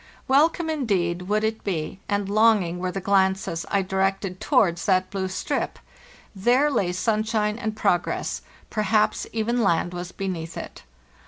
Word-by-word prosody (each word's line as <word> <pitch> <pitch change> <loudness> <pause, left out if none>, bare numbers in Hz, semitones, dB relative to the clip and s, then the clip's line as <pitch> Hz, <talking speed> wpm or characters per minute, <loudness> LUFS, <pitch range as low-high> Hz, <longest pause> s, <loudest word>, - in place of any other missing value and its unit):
Welcome, 315 +5 +3
indeed, 195 - 0
would 215 +1 +1
it 220 0 -1
be, 170 -1 -3
and 205 -1 0
longing 205 -4 +3
were 185 0 -2
the 195 - -3
glances 190 -3 +1
I 200 -1 +1
directed 190 0 -1
towards 190 - +2
that 185 -1 +2
blue 190 -1 -2
strip—there 240 +7 -2
lay 185 -9 +1
sunshine 215 +2 0
and_ 220 -2 -3
progress; 175 -4 0 0.3
per 215 - -1
haps 210 0 +1
even 230 +2 0
land 175 -3 +1
was 175 0 -5
beneath 175 -4 -5
it. - - -8
195 Hz, 145 wpm, -24 LUFS, 185-220 Hz, 0.3 s, Welcome